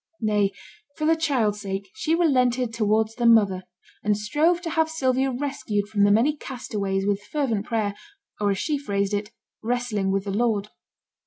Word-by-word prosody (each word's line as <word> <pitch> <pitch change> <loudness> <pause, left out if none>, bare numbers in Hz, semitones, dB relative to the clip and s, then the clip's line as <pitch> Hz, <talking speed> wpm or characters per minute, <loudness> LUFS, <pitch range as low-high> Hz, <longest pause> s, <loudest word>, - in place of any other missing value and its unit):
Nay, 210 -3 +1 0.5
for 305 - -1
the 325 +1 +4
child's 250 -10 0
sake, 195 - -5
she 330 -7 0
relented 255 -7 +2
towards 220 0 +1
the 235 0 +1
mother; 200 -5 +4 0.4
and 210 -1 +2
strove 300 +11 +2
to 330 - -3
have 320 0 +2
Sylvia 265 -4 +1
rescued 245 -6 -2
from 205 -2 +3
the 205 - +4
many 245 +9 +3
castaways 200 -8 -3
with 205 0 0
fervent 230 -4 -2
prayer, 215 -3 0 0.5
or, 205 -1 +1
as 195 - +1
she 295 +7 -1
phrased 200 -6 -1
it, 205 +1 -2 0.3
'wrestling 225 -4 -1
with 195 0 0
the 200 - -4
Lord'. 210 -1 0
220 Hz, 170 wpm, -24 LUFS, 205-270 Hz, 0.5 s, the